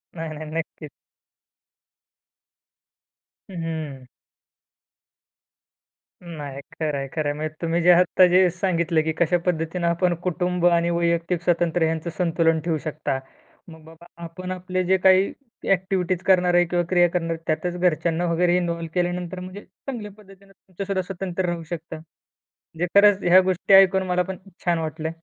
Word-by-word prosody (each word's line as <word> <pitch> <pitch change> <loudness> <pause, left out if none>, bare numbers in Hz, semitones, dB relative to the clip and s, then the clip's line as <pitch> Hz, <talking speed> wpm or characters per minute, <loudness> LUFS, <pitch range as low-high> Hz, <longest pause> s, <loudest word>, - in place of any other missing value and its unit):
नाही, 165 -1 -5
नाही, 155 - -7
नक्कीच. 160 -2 -5 2.6
हं, 180 -3 -6
हं. 155 -5 -5 2.2
नाही, 145 -5 -8
खरंय 145 -3 -3
,खरंय 150 -2 -1
म्हणजे, 155 +1 -5
तुम्ही 170 0 0
जे 180 - +7
आत्ता 180 +1 +5
जे 185 0 +5
सांगितलं, 170 -3 0
की 160 - -1
कशा 170 +1 +2
पद्धतीने 170 0 -1
आपण 175 +1 +1
कुटुंब 180 0 -1
आणि 170 -1 +3
वैयक्तिक 170 0 0
स्वतंत्र 175 -1 +1
ह्यांचं 160 +1 -1
संतुलन 165 -2 +2
ठेवू 165 -2 0
शकता. 155 -4 -3 0.5
मग 160 -1 -13
बाबा 165 +1 -15 0.2
आपण 185 +2 -7
आपले 185 0 -2
जे 190 +1 +2
काही 190 +1 +4 0.4
ॲक्टिव्हिटीज् 185 -1 0
करणार 180 -2 +3
आहे 175 0 +5
किंवा 175 +1 0
क्रिया 175 -1 +4
करणार, 165 -2 -2
त्यातच 175 +3 -1
घरच्यांना 170 -1 +1
वगैरे 175 +1 +2
इन्व्हॉल्व 170 -2 -2
केल्यानंतर 180 0 -2
म्हणजे 185 +3 -9
चांगल्या 210 +1 -8
पद्धतीने 195 -1 -18
तुमचंसुद्धा 195 0 -5
स्वतंत्र 185 0 -4
राहू 170 -1 -3
शकता. 165 0 -7
म्हणजे 160 +1 -10
खरंच 200 -1 +6
ह्या 180 +2 +6
गोष्टी 185 +1 0
ऐकून 190 0 +6
मला 180 0 +1
पण 190 - -4 0.3
छान 170 -1 +2
वाटलं. 160 0 -4
175 Hz, 140 wpm, -23 LUFS, 165-185 Hz, 2.6 s, जे